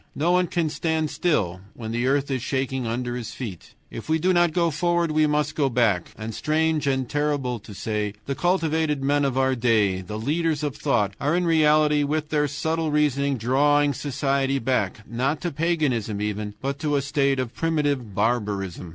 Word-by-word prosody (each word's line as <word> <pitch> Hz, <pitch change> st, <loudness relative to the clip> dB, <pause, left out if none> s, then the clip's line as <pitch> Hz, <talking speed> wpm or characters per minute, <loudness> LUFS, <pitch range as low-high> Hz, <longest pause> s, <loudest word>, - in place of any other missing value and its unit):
No 165 Hz, +4 st, +1 dB
one 180 Hz, 0 st, +3 dB
can 170 Hz, -1 st, 0 dB
stand 160 Hz, -2 st, -1 dB
still 100 Hz, -, 0 dB
when 110 Hz, -2 st, -6 dB
the 120 Hz, +2 st, 0 dB
earth 140 Hz, +1 st, +1 dB
is 130 Hz, -2 st, -1 dB
shaking 130 Hz, -1 st, -2 dB
under 120 Hz, +1 st, -2 dB
his 120 Hz, -3 st, -6 dB
feet. 105 Hz, -9 st, -8 dB, 0.2 s
If 115 Hz, -, -8 dB
we 160 Hz, -, +3 dB
do 185 Hz, +3 st, +2 dB
not 175 Hz, -1 st, +3 dB
go 170 Hz, 0 st, +1 dB
forward 170 Hz, +2 st, +1 dB
we 155 Hz, 0 st, +3 dB
must 150 Hz, 0 st, 0 dB
go 140 Hz, -3 st, +1 dB
back. 115 Hz, -8 st, +1 dB
And 110 Hz, +1 st, -5 dB
strange 155 Hz, +2 st, 0 dB
and 130 Hz, -2 st, 0 dB
terrible 145 Hz, -4 st, -1 dB
to 105 Hz, -, -13 dB
say, 105 Hz, +1 st, -2 dB
the 140 Hz, -, -2 dB
cultivated 160 Hz, -2 st, 0 dB
men 145 Hz, +1 st, +2 dB
of 135 Hz, -2 st, 0 dB
our 130 Hz, 0 st, +3 dB
day, 110 Hz, -6 st, +2 dB
the 105 Hz, +4 st, -6 dB
leaders 155 Hz, +5 st, 0 dB
of 145 Hz, -3 st, -2 dB
thought, 105 Hz, -4 st, 0 dB
are 150 Hz, +4 st, +1 dB
in 180 Hz, 0 st, +1 dB
reality 150 Hz, -2 st, +4 dB
with 150 Hz, +1 st, -1 dB
their 150 Hz, -1 st, +1 dB
subtle 160 Hz, +3 st, -1 dB
reasoning 140 Hz, -2 st, +1 dB
drawing 145 Hz, +5 st, +3 dB
society 135 Hz, 0 st, 0 dB
back, 110 Hz, -5 st, -1 dB
not 130 Hz, +6 st, -1 dB
to 175 Hz, -, -2 dB
paganism 140 Hz, -10 st, 0 dB
even, 105 Hz, 0 st, -3 dB
but 140 Hz, +1 st, -2 dB
to 150 Hz, -1 st, 0 dB
a 140 Hz, -, +2 dB
state 140 Hz, -2 st, +1 dB
of 125 Hz, -2 st, -3 dB
primitive 145 Hz, -, -1 dB
barbarism. 100 Hz, -5 st, -1 dB
140 Hz, 190 wpm, -24 LUFS, 120-155 Hz, 0.2 s, reality